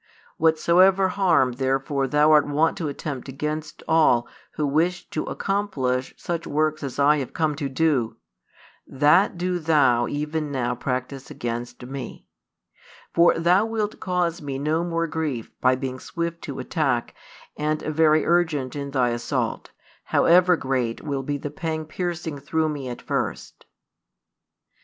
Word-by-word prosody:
Whatsoever 180 Hz, +4 st, +4 dB
harm 180 Hz, -9 st, +3 dB
therefore 135 Hz, +2 st, -1 dB
thou 150 Hz, +3 st, +4 dB
art 150 Hz, -1 st, +5 dB
wont 155 Hz, +3 st, +2 dB
to 165 Hz, -, -2 dB
attempt 140 Hz, -2 st, -5 dB
against 150 Hz, +3 st, -5 dB
all 155 Hz, -7 st, +4 dB, 0.3 s
who 150 Hz, -, -1 dB
wish 165 Hz, +5 st, 0 dB
to 155 Hz, -, -2 dB
accomplish 140 Hz, -11 st, -2 dB
such 170 Hz, -1 st, -4 dB
works 155 Hz, +1 st, 0 dB
as 140 Hz, -3 st, -5 dB
I 145 Hz, +2 st, +4 dB
have 135 Hz, -3 st, -4 dB
come 155 Hz, -2 st, +1 dB
to 140 Hz, -3 st, -3 dB
do, 135 Hz, -4 st, 0 dB, 0.7 s
that 150 Hz, +8 st, +3 dB
do 180 Hz, 0 st, -1 dB
thou 145 Hz, -7 st, +3 dB
even 150 Hz, 0 st, -3 dB
now 125 Hz, -3 st, -1 dB
practise 130 Hz, +2 st, -4 dB
against 120 Hz, -3 st, -5 dB
Me. 135 Hz, 0 st, -7 dB, 0.9 s
For 170 Hz, 0 st, +5 dB
thou 180 Hz, +6 st, +3 dB
wilt 220 Hz, -2 st, -2 dB
cause 175 Hz, -2 st, -1 dB
Me 140 Hz, -2 st, -4 dB
no 155 Hz, +4 st, 0 dB
more 165 Hz, -1 st, -1 dB
grief 155 Hz, -8 st, -3 dB
by 130 Hz, 0 st, +4 dB
being 130 Hz, 0 st, -5 dB
swift 170 Hz, +3 st, -4 dB
to 140 Hz, -, -6 dB
attack 135 Hz, -8 st, -1 dB, 0.4 s
and 150 Hz, 0 st, -1 dB
|203 155 Hz, -, -3 dB
very 155 Hz, 0 st, +4 dB
urgent 160 Hz, -7 st, +1 dB
in 140 Hz, -1 st, -4 dB
thy 130 Hz, -3 st, +1 dB
assault, 120 Hz, 0 st, -2 dB, 0.4 s
however 180 Hz, +1 st, +4 dB
great 130 Hz, -5 st, -2 dB
will 140 Hz, -3 st, -2 dB
be 145 Hz, +2 st, -3 dB
the 145 Hz, +1 st, -6 dB
pang 160 Hz, -1 st, -3 dB
piercing 165 Hz, -2 st, -4 dB
through 155 Hz, +3 st, 0 dB
Me 140 Hz, -4 st, -4 dB
at 120 Hz, -, -7 dB
first." -, -, -4 dB
150 Hz, 145 wpm, -24 LUFS, 135-165 Hz, 0.9 s, art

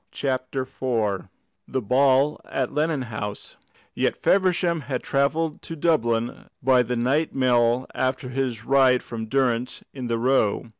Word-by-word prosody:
CHAPTER 130 Hz, -1 st, -2 dB
IV 115 Hz, -7 st, -2 dB, 0.4 s
THE 130 Hz, -, -1 dB
BALL 135 Hz, +5 st, +3 dB
AT 130 Hz, -1 st, -2 dB
LENNON 150 Hz, -2 st, 0 dB
HOUSE 105 Hz, -3 st, -6 dB, 0.4 s
Yet -, -, 0 dB
Feversham 180 Hz, -3 st, +2 dB
had 130 Hz, -1 st, -4 dB
travelled 150 Hz, +3 st, 0 dB
to 165 Hz, -, -7 dB
Dublin 120 Hz, -7 st, 0 dB
by 130 Hz, -1 st, +5 dB
the 125 Hz, 0 st, -2 dB
night 135 Hz, +7 st, 0 dB
mail 125 Hz, -1 st, +2 dB
after 130 Hz, -1 st, -1 dB
his 125 Hz, -4 st, -2 dB
ride 130 Hz, -2 st, +4 dB
with 110 Hz, -1 st, -5 dB
Durrance 125 Hz, -2 st, 0 dB
in 130 Hz, -3 st, -5 dB
the 115 Hz, -1 st, 0 dB
Row. 120 Hz, -2 st, +1 dB
130 Hz, 140 wpm, -24 LUFS, 120-140 Hz, 0.4 s, by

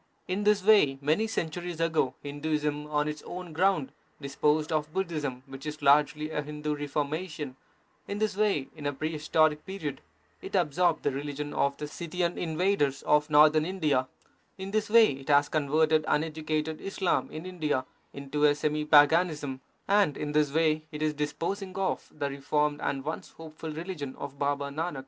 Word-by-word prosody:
In 195 Hz, +3 st, -2 dB
this 210 Hz, -2 st, +3 dB
way, 195 Hz, -10 st, +5 dB
many 155 Hz, +10 st, +1 dB
centuries 175 Hz, -3 st, -3 dB
ago, 160 Hz, -6 st, +1 dB
Hinduism 150 Hz, 0 st, -2 dB
on 150 Hz, 0 st, 0 dB
its 150 Hz, 0 st, -4 dB
own 180 Hz, -2 st, -8 dB
ground 180 Hz, -4 st, +2 dB, 0.3 s
disposed 150 Hz, +3 st, 0 dB
of 155 Hz, -1 st, -1 dB
Budhism, 155 Hz, -8 st, -3 dB
which 135 Hz, +2 st, -9 dB
was 150 Hz, 0 st, -6 dB
largely 150 Hz, +2 st, +3 dB
a 150 Hz, -, -1 dB
Hindu 150 Hz, 0 st, -4 dB
reformation; 145 Hz, 0 st, -3 dB, 0.5 s
in 200 Hz, -, -3 dB
this 215 Hz, -2 st, 0 dB
way, 200 Hz, -10 st, +1 dB
in 150 Hz, -2 st, -4 dB
a 145 Hz, -, -1 dB
prehistoric 155 Hz, +1 st, +1 dB
period, 155 Hz, -8 st, -5 dB, 0.4 s
it -, -, -6 dB
absorbed 175 Hz, -1 st, +2 dB
the 145 Hz, -, +1 dB
religion 145 Hz, +1 st, -4 dB
of 140 Hz, 0 st, +1 dB
the 150 Hz, -, -5 dB
Scythian 170 Hz, +2 st, -2 dB
invaders 160 Hz, -4 st, 0 dB
of 150 Hz, +1 st, +3 dB
Northern 155 Hz, +1 st, +6 dB
India; 155 Hz, -8 st, 0 dB, 0.5 s
in 190 Hz, 0 st, -6 dB
this 215 Hz, 0 st, 0 dB
way 225 Hz, 0 st, +7 dB
it 135 Hz, +1 st, -8 dB
has 145 Hz, 0 st, +5 dB
converted 155 Hz, +1 st, +2 dB
uneducated 155 Hz, 0 st, -1 dB
Islam 195 Hz, -2 st, 0 dB
in 155 Hz, +3 st, -7 dB
India 155 Hz, -8 st, -1 dB, 0.3 s
into 140 Hz, +2 st, -1 dB
a 145 Hz, 0 st, +5 dB
semi 150 Hz, 0 st, -1 dB
paganism; 150 Hz, -2 st, +4 dB, 0.3 s
and 200 Hz, -7 st, +3 dB
in 150 Hz, -, -3 dB
this 150 Hz, -1 st, +2 dB
way 155 Hz, 0 st, +2 dB
it 150 Hz, 0 st, -4 dB
is 155 Hz, -1 st, +1 dB
disposing 170 Hz, +6 st, -3 dB
of 195 Hz, -1 st, -2 dB
the 140 Hz, -, -1 dB
reformed 145 Hz, +2 st, -1 dB
and 135 Hz, -1 st, -2 dB
once 155 Hz, -, -5 dB
hopeful 160 Hz, 0 st, -9 dB
religion 155 Hz, -4 st, -5 dB
of 140 Hz, 0 st, -8 dB
Baba 140 Hz, 0 st, 0 dB
Nanak. 155 Hz, +1 st, -3 dB
150 Hz, 165 wpm, -28 LUFS, 145-170 Hz, 0.5 s, way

